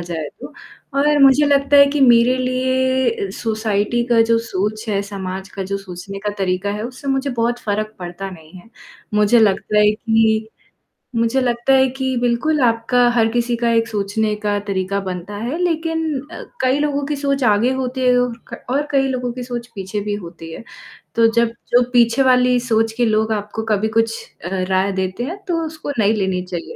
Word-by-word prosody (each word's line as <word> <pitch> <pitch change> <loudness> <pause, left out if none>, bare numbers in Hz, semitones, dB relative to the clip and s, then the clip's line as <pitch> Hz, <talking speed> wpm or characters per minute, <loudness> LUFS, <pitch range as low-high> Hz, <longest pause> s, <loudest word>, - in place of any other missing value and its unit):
जाए 165 -3 -5
तो - - -9 0.5
और 295 +1 +3
मुझे 275 +2 +6
लगता 280 0 +3
है 280 - +8
कि 285 +1 -1
मेरे 245 -1 +5
लिए 255 -3 0
सोसाइटी 220 +2 -1
का 235 -2 +3
जो 230 0 +2
सोच 210 +3 -2
है, 200 -2 0
समाज 190 -1 -6
का 195 - -6
जो 200 +1 -3
सोचने 195 +1 -8
का 210 +1 -3
तरीका 190 +1 -1
है, 210 +1 -4
उससे 255 +3 -7
मुझे 270 +1 0
बहुत 240 0 -1
फ़र्क 215 0 -3
पड़ता 180 +2 -6
नहीं 160 -3 -14
है। 225 - -21 0.4
मुझे 210 +3 +4
लगता 210 0 +2
है 210 0 +5
कि 220 0 +1 0.7
मुझे 230 +3 +1
लगता 240 +1 +1
है 265 0 +5
कि 260 -1 -1
बिल्कुल 250 +6 +1
आपका 240 +1 +2
हर 225 -1 +4
किसी 240 0 0
का 235 0 0
एक 230 0 +2
सोचने 210 +1 -1
का 210 -1 -1
तरीका 195 0 -1
बनता 185 +1 -6
है, 245 +9 -3
लेकिन 325 -3 -1
अ, - - -8 0.2
कई 260 +2 +2
लोगों 285 -1 -1
की 295 +1 -2
सोच 275 -1 -1
आगे 220 +3 +3
होती 260 0 -3
है 250 -1 +4
और 245 -1 0 0.2
क - - -8
और 285 +3 0
कई 270 -1 +2
लोगों 250 -2 -2
की 250 0 -6
सोच 240 -1 -5
पीछे 195 +1 -4
भी 205 0 -3
होती 170 -4 -9
है। - - -9 0.5
तो 230 - +4
जब 235 -1 +3 0.2
जो 245 +1 +5
पीछे 240 +1 +3
वाली 250 -1 +4
सोच 225 -2 +1
के 245 - +2
लोग 220 0 +1
आपको 210 +1 -4
कभी 215 0 +1
कुछ 225 0 +1 0.3
अ, - - -3 0.2
राय 190 +1 +1
देते 190 +4 -3
हैं 340 +9 -4
तो 335 -2 0
उसको 315 -2 -6
नहीं 210 +1 +3
लेनी 190 -3 -1
चाहिए, 175 -2 -6
230 Hz, 195 wpm, -19 LUFS, 205-260 Hz, 0.7 s, है